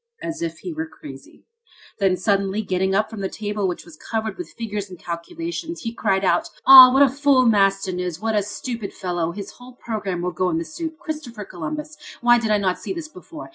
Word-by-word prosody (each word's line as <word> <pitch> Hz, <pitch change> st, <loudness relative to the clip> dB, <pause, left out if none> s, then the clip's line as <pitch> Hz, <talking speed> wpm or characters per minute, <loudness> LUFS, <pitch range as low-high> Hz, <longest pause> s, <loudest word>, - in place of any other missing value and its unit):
as 330 Hz, 0 st, -4 dB
if 335 Hz, -, -4 dB
he 355 Hz, -, -6 dB
were 320 Hz, +1 st, -4 dB
crazy. -, -, -13 dB, 0.6 s
Then, 190 Hz, -2 st, +2 dB
suddenly 200 Hz, +2 st, 0 dB
getting 190 Hz, 0 st, 0 dB
up 215 Hz, +2 st, +2 dB
from 220 Hz, -3 st, -7 dB
the 190 Hz, -, -2 dB
table, 210 Hz, -2 st, -2 dB
which 180 Hz, -, -4 dB
was 170 Hz, -3 st, -13 dB
covered 220 Hz, +3 st, -3 dB
with 355 Hz, -, -6 dB
figures 210 Hz, -3 st, -4 dB
and 180 Hz, -, -10 dB
calculations, 330 Hz, -, -5 dB
he 230 Hz, -1 st, -3 dB
cried 195 Hz, -4 st, 0 dB
out: -, -, +2 dB, 0.2 s
"Ah! 260 Hz, -1 st, +11 dB
What 270 Hz, +2 st, +6 dB
a -, -, +6 dB
fool 275 Hz, -1 st, +3 dB
Maston 195 Hz, -4 st, +2 dB
is! 180 Hz, -2 st, -3 dB
what 220 Hz, +1 st, -1 dB
a 210 Hz, -, +2 dB
stupid 210 Hz, +1 st, -5 dB
fellow! 175 Hz, -3 st, -2 dB
His 200 Hz, +2 st, -7 dB
whole 250 Hz, +1 st, -14 dB
problem 200 Hz, -7 st, -4 dB
will 180 Hz, -, -1 dB
go 180 Hz, +2 st, 0 dB
in 165 Hz, -, 0 dB
the 165 Hz, -, -2 dB
soup! 320 Hz, -, -6 dB
Christopher 300 Hz, -, -6 dB
Columbus! 300 Hz, -, -6 dB, 0.2 s
Why 240 Hz, 0 st, +5 dB
did 225 Hz, -2 st, -2 dB
I 210 Hz, -, +4 dB
not 190 Hz, -3 st, 0 dB
see -, -, -4 dB
this 335 Hz, -4 st, -6 dB
before? 330 Hz, -2 st, -11 dB
215 Hz, 215 wpm, -22 LUFS, 190-270 Hz, 0.6 s, Ah